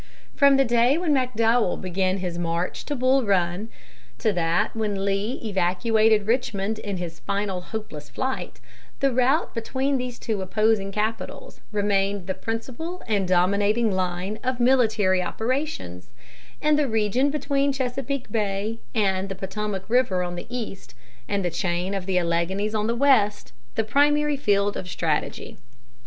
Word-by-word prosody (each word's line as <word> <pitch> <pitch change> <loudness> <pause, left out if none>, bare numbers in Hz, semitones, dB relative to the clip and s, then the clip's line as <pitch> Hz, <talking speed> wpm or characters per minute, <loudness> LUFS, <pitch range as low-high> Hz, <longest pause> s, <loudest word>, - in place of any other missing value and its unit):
From 280 -1 +5
the 270 - +4
day 240 +4 +3
when 335 -3 +1
McDowell 235 -5 +2
began 185 +1 0
his 180 -2 -4
march 170 +1 -2
to 290 - -2
Bull 260 +1 +3
Run, 190 +1 0 0.5
to 215 -3 +1
that 170 +2 +1
when 205 -3 -1
Lee 200 +6 -1
evacuated 215 +2 +2
Richmond 220 -2 0
in 200 -3 -4
his 170 -2 -6
final 200 -2 -2
hopeless 180 -7 -7
flight, 260 0 -4 0.4
the 275 -2 +2
route 260 +6 +2
between 265 +4 -1
these 250 -1 -4
two 215 -4 -3
opposing 210 +1 +1
capitals 220 - -4
remained 200 -2 0
the 190 - -2
principal 255 - -5
and 200 -4 +1
dominating 200 +5 +2
line 185 +2 -2
of 255 -1 -1
military 220 -7 +3
operations, 220 - -3 0.5
and 300 0 +4
the 295 - +2
region 225 +4 +2
between 280 -1 +1
Chesapeake 270 -1 -3
Bay 210 +1 -1 0.2
and 195 -3 +1
the 195 - -4
Potomac 190 0 -4
River 220 -6 +2
on 175 0 -4
the 175 - -7
east, 230 -6 -6 0.3
and 200 -2 -1
the 175 - 0
chain 175 +2 -1
of 195 -2 -4
the 190 -1 +1
Alleghanies 180 +5 0
on 215 0 0
the 230 - 0
west, 235 -6 +3 0.2
the 220 - +1
primary 295 +5 +3
field 205 -6 +1
of 180 - -5
strategy. 160 -3 -2
210 Hz, 150 wpm, -24 LUFS, 190-250 Hz, 0.5 s, From